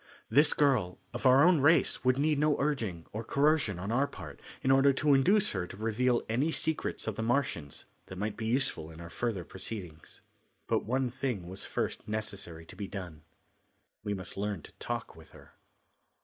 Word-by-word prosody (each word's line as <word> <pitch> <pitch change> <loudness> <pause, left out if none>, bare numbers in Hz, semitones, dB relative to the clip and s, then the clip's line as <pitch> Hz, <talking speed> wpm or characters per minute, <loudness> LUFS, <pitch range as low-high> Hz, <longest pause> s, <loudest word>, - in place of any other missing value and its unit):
This 150 +2 +5
girl 125 -12 +2 0.2
of 120 +2 +1
our 130 +2 +7
own 180 -3 +5
race 160 +1 +4
would 130 0 +3
need 150 +1 +2
no 150 0 +2
urging, 115 - -1
or 110 +2 -3
coercion, 140 - +2
on 95 +4 -4
our 135 +4 +2
part 75 - -10 0.2
in 130 - +3
order 135 +1 +5
to 145 +2 +3
induce 195 +10 +4
her 90 -3 -2
to 95 - -10
reveal 120 +3 +1
any 130 +9 +1
secrets 160 0 -2
of 110 -3 -3
the - - -2
Martians 110 - -1 0.2
that 95 - -8
might 105 +2 -2
be 110 0 -4
useful 115 - 0
in 80 0 -12
our 85 0 -9
further 110 -1 -2
proceedings. 90 -4 -8 0.4
But - - 0
one 130 +2 0
thing 120 -8 -3
was 95 +2 -7
first - - -3
necessary 100 -6 -4
to - - -12
be 100 - -5
done. 90 -7 -7 0.8
We 105 -1 -1
must 95 0 -7
learn 100 -5 -2
to - - -12
talk - - -4
with - - -16
her. - - -16
115 Hz, 190 wpm, -31 LUFS, 95-140 Hz, 0.8 s, our